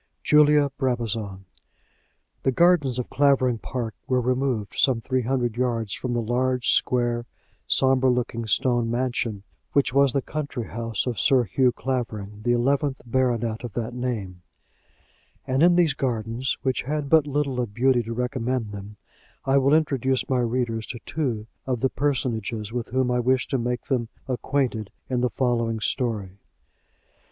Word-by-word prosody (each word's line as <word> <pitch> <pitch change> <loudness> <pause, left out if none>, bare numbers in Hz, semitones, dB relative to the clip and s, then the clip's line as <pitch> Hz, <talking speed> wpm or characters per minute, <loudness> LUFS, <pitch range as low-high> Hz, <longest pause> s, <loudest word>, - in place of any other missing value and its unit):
JULIA 150 -1 +5
BRABAZON. 115 -7 -2 1.0
The 135 - +2
gardens 150 -4 +3
of 125 - -4
Clavering 130 -4 +3
Park 120 -3 -4
were 130 -1 +2
removed 125 -4 -1
some 130 -4 +3
three 130 +2 -1
hundred 120 -2 -1
yards 115 -5 -1
from 125 -1 -3
the 120 -1 0
large, 125 +2 +1
square, 120 -1 +1 0.4
sombre 130 -1 +3
looking 120 -2 -1
stone 120 +1 +2
mansion 120 -4 -1 0.3
which 140 -3 +2
was 140 -1 +4
the 140 - 0
country 140 -6 -4
house 115 -2 -2
of 125 -3 -2
Sir 135 -4 +4
Hugh 125 +5 +2
Clavering, 115 -5 -4
the 120 +2 +1
eleventh 135 +3 +1
baronet 120 -2 0
of 120 -4 -6
that 120 +1 -3
name; 110 -8 -4 1.0
and 130 +1 0
in 175 +1 +6
these 170 -5 +4
gardens, 120 -1 -2
which 130 -1 0
had 150 +2 -2
but 155 0 +4
little 140 -3 0
of 105 -4 -5
beauty 125 0 +3
to 115 0 -5
recommend 125 -2 -2
them, 100 +1 -9 0.5
I 135 +1 +4
will 140 +3 +4
introduce 135 -4 +1
my 130 -2 +1
readers 120 -2 -1
to 120 - -6
two 125 -9 -2 0.2
of 125 -3 -1
the 130 - +2
personages 115 -6 -2
with 120 -2 -3
whom 130 0 +1
I 125 - +1
wish 130 +1 +2
to 135 - 0
make 120 +1 -2
them 120 -4 -1 0.2
acquainted 125 -4 -1 0.2
in 125 -1 +1
the 125 - +2
following 115 -3 0
story. 105 -5 -2
125 Hz, 155 wpm, -25 LUFS, 115-130 Hz, 1.0 s, in